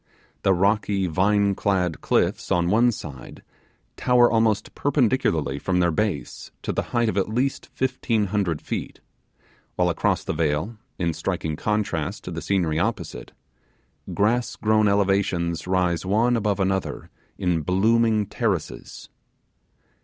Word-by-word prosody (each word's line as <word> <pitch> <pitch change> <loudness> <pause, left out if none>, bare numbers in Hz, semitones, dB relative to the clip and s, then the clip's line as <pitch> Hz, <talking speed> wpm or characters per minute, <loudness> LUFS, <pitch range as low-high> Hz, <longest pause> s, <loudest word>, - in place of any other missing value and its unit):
The 95 - +3
rocky 100 +1 +1
vine 100 +4 +2
clad 90 -5 0
cliffs - - 0
on 85 0 +2
one 120 +3 +4
side 75 - -9 0.5
tower 125 -1 +4
almost 110 -2 +1
perpendicularly 120 - +1
from 90 +5 -1
their 85 -1 +3
base 80 - -3
to - - -2
the - - -1
height 120 -1 +1
of 100 - -1
at 100 - +1
least 125 +5 -1
fifteen 130 -4 0
hundred 90 -7 0
feet; - - -5 0.8
while 90 -1 +2
across 85 - 0
the - - -3
vale 80 +7 -1 0.2
in 85 -2 0
striking 80 0 -3
contrast 100 -2 -2
to 90 - -6
the 85 -1 -5
scenery 80 -2 0
opposite 100 -3 -3 0.8
grass 115 +4 +1
grown 110 -1 +2
elevations 95 -4 +1
rise 90 -2 +1
one 110 +6 +2
above 105 -3 0
another 95 0 -2 0.3
in 90 -3 0
blooming 110 +5 +2
terraces. 100 -5 -3
100 Hz, 130 wpm, -24 LUFS, 85-110 Hz, 0.8 s, one